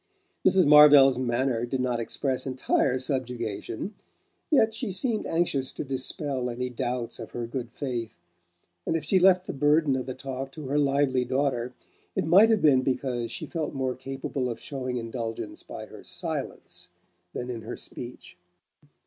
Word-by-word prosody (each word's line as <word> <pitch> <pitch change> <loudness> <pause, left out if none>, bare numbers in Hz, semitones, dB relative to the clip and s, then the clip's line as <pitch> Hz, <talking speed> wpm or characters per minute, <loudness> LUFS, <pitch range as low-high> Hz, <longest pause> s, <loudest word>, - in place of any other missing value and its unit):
Mrs. 190 -2 +5
Marvell's 145 -3 +8
manner 120 -1 0
did 130 +2 -2
not 125 -2 0
express 130 +3 -1
entire 130 0 +1
subjugation; 125 - -3 0.6
yet 225 -8 +4
she 220 -1 -2
seemed 215 +3 -1
anxious 155 -6 0
to - - -4
dispel 135 -1 -2
any 125 +1 -3
doubts 120 0 -3
of 115 - -8
her 120 -1 -3
good 120 0 -5
faith, 120 -7 -4 0.7
and - - +1
if 160 - -1
she 185 +5 +3
left 185 0 +5
the - - -4
burden 145 0 +3
of 130 0 -3
the 130 - -4
talk 135 0 -5
to 155 -2 -7
her 145 +2 +2
lively 140 -2 +2
daughter 125 -1 -1 0.4
it - - 0
might 195 +8 +7
have 220 -2 +2
been 135 -4 +6
because 125 -2 -2
she - - -4
felt 160 -4 -4
more 130 -1 -1
capable 130 0 -4
of 115 -1 -5
showing 130 -3 -4
indulgence 115 -1 -5
by - - -8
her - - -13
silence - - -4 0.4
than 125 0 -4
in 115 -2 -5
her 110 - -6
speech. 120 -6 -7
130 Hz, 165 wpm, -27 LUFS, 125-150 Hz, 0.7 s, Marvell's